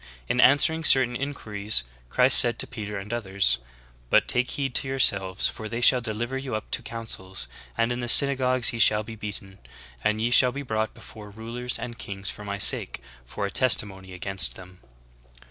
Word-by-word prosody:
In 125 - 0
answering 160 +4 +3
certain 130 -4 +4
inquiries 110 - -2 0.3
Christ - - +8
said - - +4
to - - -3
Peter 105 -1 -8
and 100 +3 -8
others: 100 -4 -1 0.5
"But - - +2
take 125 +1 +1
heed 135 -3 -4
to 135 - 0
yourselves: 100 -8 +1
for 110 -1 -8
they 115 - -5
shall 125 +1 +4
deliver 120 +3 -5
you 135 -4 -6
up 110 - -8
to - - 0
councils; 105 -5 -6 0.3
and 115 +1 0
in 120 - -4
the 120 - -5
synagogues 130 -1 +3
ye 115 - -6
shall 105 -1 +3
be 110 +1 -10
beaten; 100 -2 -8 0.4
and 105 0 -1
ye 115 +2 -2
shall 125 0 +5
be 140 +2 -7
brought 110 -3 -4
before 105 -2 -13
rulers 115 +4 -6
and 120 -1 -9
kings 100 0 -6
for 105 - -12
my 100 0 -6
sake - - +2 0.3
for 100 +11 -5
a 100 - -5
testimony 100 -7 +2
against 90 -1 -1
them." 90 0 -15
110 Hz, 185 wpm, -24 LUFS, 100-125 Hz, 0.5 s, Christ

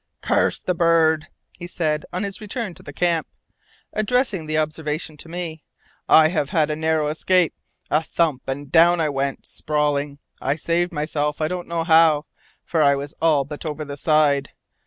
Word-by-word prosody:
"Curse - - +1
the 180 - -1
bird!" 165 -2 +3 0.3
he 175 - -6
said 155 -4 -1
on 180 - -3
his 200 +2 -4
return 215 -2 -4
to - - -13
the 145 - -9
camp, 170 +1 0 0.7
addressing 215 - 0
the 155 0 -1
observation 155 0 -2
to 165 - -8
me. 165 -2 -6 0.5
"I 155 0 +7
have 155 -5 -1
had 155 -2 +1
a - - -1
narrow 160 0 +1
escape! 170 +3 +2 0.4
A 155 - +3
thump, 160 -5 0
and 140 +2 -4
down 170 +4 +5
I 155 -2 +1
went, 140 -1 -2
sprawling. 145 -1 -1 0.2
I 135 +2 0
saved 170 +3 0
myself 150 -2 -2
I 155 - +1
don't 180 -1 -4
know 170 -1 -1
how, 160 -2 +5 0.4
for 165 - 0
I 140 -1 +5
was 140 +2 -6
all 155 -4 +3
but 145 +1 -8
over 155 -1 -4
the 140 0 -6
side. 145 -1 +2
155 Hz, 180 wpm, -22 LUFS, 150-170 Hz, 0.7 s, I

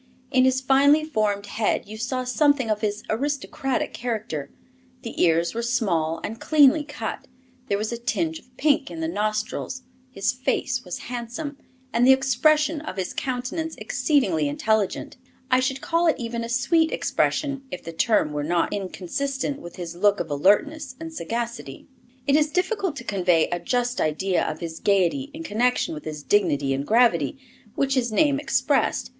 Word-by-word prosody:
In 260 -2 +4
his 260 0 +2
finely 280 +3 +5
formed 210 -8 0
head 210 0 -1
you 215 - -8
saw 255 +3 -2
something 260 -1 +2
of 210 - -1
his 210 0 -2
aristocratic 270 +1 -2
character; 215 - -4 0.5
the 230 - -4
ears 170 0 +3
were 230 - -2
small 180 -10 0
and 225 +2 -5
cleanly 300 0 +5
cut, 295 - -6 0.4
there 200 - +1
was 215 +2 -2
a 235 - -4
tinge 320 +7 -1
of 250 0 -27
pink 285 -1 +2
in 330 - -7
the 320 - -1
nostrils, 215 +1 -2 0.3
his 195 -6 0
face 255 0 -1
was 180 -2 -6
handsome, 245 +5 -5 0.4
and 240 +2 +4
the 265 - +9
expression 300 +4 +2
of 305 - -7
his 185 -2 -3
countenance 265 +6 -3
exceedingly 185 - +1
intelligent 220 - -1 0.3
I 255 - +5
should 260 +1 -1
call 335 +1 +1
it 320 - +4
even 235 -1 -4
a 230 - -5
sweet 320 +7 +2
expression 280 -2 0
if 180 - -7
the 165 - -7
term 190 -3 +2
were 145 0 -2
not 170 +2 0
inconsistent 265 +9 -3
with 175 - -10
his 170 -2 -6
look 205 +3 +3
of 165 -3 -4
alertness 255 - +2
and 325 0 -7
sagacity. 235 - -5 0.4
It 280 - +3
is 305 0 +3
difficult 365 0 -1
to - - -7
convey 180 -6 +2
a 175 - -2
just 245 +6 -1
idea 175 +4 +1
of 155 +2 -6
his 165 -1 -5
gaiety 200 +8 +1
in 315 +3 -8
connection 245 - +1
with 150 - -8
his 150 -2 -6
dignity 145 -9 +2
and 140 +1 -3
gravity, 220 - +3 0.4
which 275 -1 +1
his 245 -3 +1
name 280 +4 +3
expressed. 300 - +1
240 Hz, 170 wpm, -24 LUFS, 195-280 Hz, 0.5 s, the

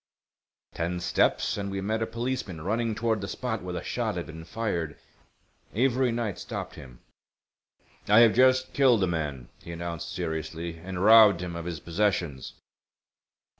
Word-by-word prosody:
Ten 85 +1 -2
steps 105 - +1
and 100 -1 -3
we 95 0 -3
met 110 +3 -1
a 110 - 0
policeman 115 -8 -4
running 110 +5 -1
toward 110 -2 0
the 100 - -4
spot 115 -1 -3
where 90 -1 -5
the 85 - -4
shot - - -2
had - - -3
been 80 0 -9
fired. 85 -6 -3 0.8
Avery 125 +1 +2
Knight 115 -4 -3
stopped - - -6
him. 65 -4 -13 1.1
"I 105 +3 +7
have 115 -2 +6
just 130 +1 +4
killed 125 -7 +4
a - - +2
man," 75 -7 -3
he 85 - -9
announced, 85 0 -5
seriously, 80 0 -4
"and 95 +1 -5
robbed 105 -4 +7
him 90 -2 -5
of 85 -1 -5
his 85 -3 -4
possessions." 85 -7 -1
95 Hz, 160 wpm, -27 LUFS, 85-115 Hz, 1.1 s, I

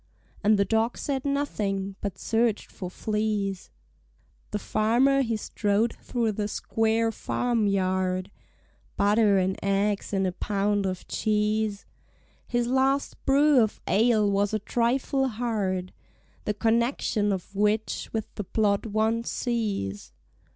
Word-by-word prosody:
And 210 +1 +4
the 200 - +3
dog 225 +3 +1
said 270 -2 -2
nothing, 200 -9 -1
but 200 -3 -4
search'd 225 -1 0
for 180 - -6
fleas. 210 -2 -2 0.8
The 210 - -2
farmer 240 +7 +2
he 230 -4 0
strode 210 +1 0
through 235 -3 -2
the 205 0 -2
square 225 +1 0
farmyard; 190 -6 0 0.7
(Butter 205 0 +4
and 190 0 0
eggs 200 +1 0
and 195 -1 +1
a 185 - 0
pound 200 +1 0
of 185 -1 -5
cheese) 210 -1 0 0.6
His 240 0 0
last 265 +3 0
brew 280 -1 +5
of 215 -2 0
ale 215 0 +3
was 200 +1 +1
a - - 0
trifle 255 +5 0
hard— 210 -6 -2 0.5
The 210 - -1
connexion 225 -2 +1
of 195 +1 -4
which 210 +2 0
with 220 -1 -2
the 210 - -4
plot 205 +2 +1
one 220 +2 +1
sees. 195 - -3
215 Hz, 125 wpm, -26 LUFS, 200-230 Hz, 0.8 s, brew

